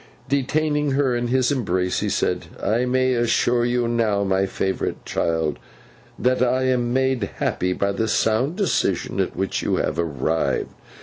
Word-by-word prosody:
Detaining 150 +2 0
her 135 -3 +2
in 120 0 -1
his 130 +2 +2
embrace, 95 -9 0
he - - -1
said, - - -1
'I 115 +4 +1
may 130 0 +2
assure 120 0 +2
you 120 0 +1
now, 110 -4 +1
my 95 0 +1
favourite 95 0 -3
child, 80 -4 -1 0.6
that 125 0 +1
I 130 +1 +2
am 125 -2 +1
made 130 -1 +1
happy 90 0 -1
by 100 +2 0
the 110 +3 -1
sound 110 +8 +1
decision 200 -4 0
at - - -1
which - - -1
you - - 0
have - - -1
arrived. 80 0 -1
120 Hz, 160 wpm, -22 LUFS, 100-130 Hz, 0.6 s, her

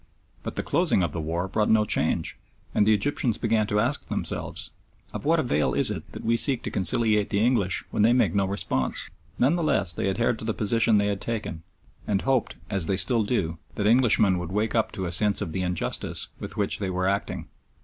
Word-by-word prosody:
But - - -6
the - - -2
closing 95 - +2
of 85 - -1
the 85 - -3
war 85 +4 -2
brought 105 +2 0
no 110 -1 +4
change, - - 0 0.4
and 105 - +2
the 110 - +6
Egyptians 115 +1 0
began 110 -2 +1
to 105 - +1
ask 130 +6 -1
themselves, - - -4 0.4
Of - - -6
what - - +3
avail 75 +1 0
is - - +5
it - - -7
that - - -8
we 115 +1 +2
seek 130 0 +1
to - - -4
conciliate 105 +1 +2
the 100 - 0
English 110 -7 +1
when - - 0
they 110 +3 +5
make 125 +1 +2
no 100 -1 +1
response? 65 -10 -1 0.3
None 135 +7 +3
the 175 - -1
less 90 - +1
they - - -1
adhered 115 +3 0
to - - -3
the 110 - -2
position 115 +1 +2
they 100 - +2
had 100 -1 -2
taken, 110 -8 -4 0.5
and 100 -2 0
hoped, 135 -2 0
as 95 -6 0
they 95 - 0
still 115 +3 +3
do, 85 -7 -2 0.2
that 100 - -2
Englishmen 110 -5 +4
would 90 0 -6
wake 105 +3 -1
up 115 -2 +1
to 95 -3 -4
a 85 - -3
sense 105 +3 +4
of 80 - -3
the 95 - -2
injustice 90 -2 -2
with - - -8
which - - -1
they 100 -2 -2
were 95 0 -1
acting. 100 +1 -2
105 Hz, 220 wpm, -25 LUFS, 95-115 Hz, 0.5 s, the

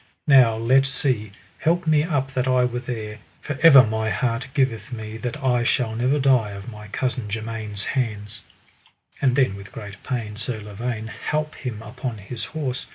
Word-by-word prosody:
Now 130 -6 +6
let 130 +4 +4
see, 125 -6 -1 0.3
help 170 +2 +1
me 155 -2 +4
up 140 -5 -1
that 130 -1 0
I 130 -1 +4
were 125 0 -2
there, 110 -4 -5 0.2
for 145 -2 -5
ever 145 -6 +10
my 110 0 -1
heart 115 +4 -1
giveth 130 -2 0
me 110 -2 -6
that 120 +5 -4
I 125 -2 +3
shall 120 -1 +1
never 125 +5 +2
die 130 -6 +3
of 100 +2 -9
my 105 -1 -10
cousin 125 0 -2
germain's 110 -1 -4
hands. 105 -6 -3 0.8
And 130 -3 +3
then 130 -8 +3
with 100 0 -11
great 100 -2 -9
pain 110 -5 -4
Sir 110 +1 -2
Lavaine 110 +2 -4
halp 150 +6 -3
him 115 -5 -6
upon 125 +1 -5
his 110 +4 -6
horse. 135 -5 -3
120 Hz, 175 wpm, -23 LUFS, 110-130 Hz, 0.8 s, ever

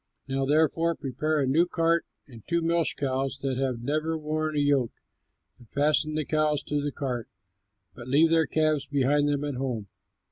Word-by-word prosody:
Now 135 0 -1
therefore 160 +3 +2
prepare 150 +4 -1
a - - +2
new 160 +7 +3
cart 165 -1 +1 0.2
and 120 -5 -13
two 170 -1 0
milch 165 -3 +1
cows 135 0 -1
that 130 -2 -1
have 130 -3 -2
never 155 +4 -1
worn 155 0 -2
a - - +3
yoke, 140 -4 +2 0.7
and 120 - -18
fasten 150 +1 +2
the 155 -1 -1
cows 155 -1 +1
to 150 -1 -1
the 145 0 -2
cart, 125 -5 -4 0.6
but 120 +1 -10
leave 155 +5 +4
their 165 -1 +3
calves 155 -2 +1
behind 145 +1 +2
them 145 0 0
at 145 -1 -2
home. 120 -6 -3
145 Hz, 180 wpm, -27 LUFS, 135-155 Hz, 0.7 s, leave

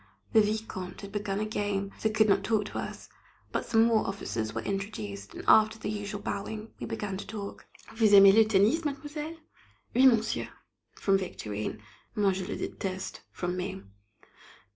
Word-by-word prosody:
The 220 - +7
Vicomte 210 -4 -3
had 200 -1 -8
begun 205 -1 -2
a 215 - 0
game, 205 -2 -2
so 220 - +1
could 215 0 +3
not 195 -1 +3
talk 210 0 +1
to - - -5
us, - - -6 0.4
but - - -2
some 225 -1 +5
more 225 -2 +3
officers 110 - -3
were 110 0 -4
introduced, 110 - -5
and, - - -7
after 220 0 +6
the 215 - -4
usual 205 0 -4
bowing, 215 +2 -5
we - - -5
began 195 -2 -3
to - - -7
talk. 200 -1 -7 0.3
"Vous 220 -2 +3
aimez 195 0 +9
le 220 +2 +7
tennis, 215 +10 +3
mademoiselle?" 300 +2 -4 0.6
"Oui, 260 +2 +7
monsieur," 230 -3 +2 0.5
from 195 -1 +2
Victorine. 105 - -5 0.3
"Moi, 205 -2 +3
je 185 -1 -3
le - - -3
déteste," 190 -1 -4
from 180 0 -3
me. 190 +1 -4
205 Hz, 170 wpm, -29 LUFS, 190-220 Hz, 0.6 s, aimez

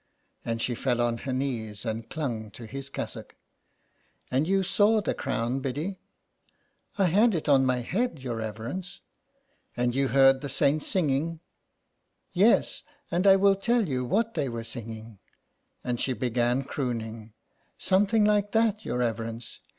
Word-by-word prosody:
And 115 -1 -2
she 125 - 0
fell 120 0 -1
on 120 -1 +1
her - - +1
knees 120 -5 -3
and 110 0 -4
clung 120 -8 -3
to 120 - -9
his 135 +4 -7
cassock. - - -6 0.5
" - - -38
And 135 +5 +1
you 195 +1 +2
saw 205 +3 +3
the 205 - -1
crown, 130 -1 -2
Biddy? 150 +9 -3 0.3
" - - -43
" - - -33
I 200 - +3
had 205 +5 +4
it 160 - -3
on 135 -2 +5
my 125 -1 +1
head, 200 - -1
your 125 -4 -4
reverence." 115 - -5 0.4
" 275 - -40
And 120 0 +1
you 135 +1 +1
heard 135 +1 +5
the 140 - -4
saints 140 +3 +1
singing." 160 -2 +1
'^ 165 - -14 0.9
Yes, 200 +6 +3 0.3
and 180 +3 +2
I 195 - +9
will 195 0 +4
tell 225 +2 +1
you 130 -3 -1
what 225 - 0
they 145 -5 -1
were 115 -1 -4
singing," 115 -2 -8 0.6
and 120 -1 -2
she 130 - +1
began 125 +1 0
crooning. 115 -5 -4 0.2
" - - -42
Something 205 +3 +3
like 205 -1 +2
that 220 -1 +2
your - - -2
reverence. 115 -1 -3
135 Hz, 170 wpm, -27 LUFS, 120-190 Hz, 0.9 s, I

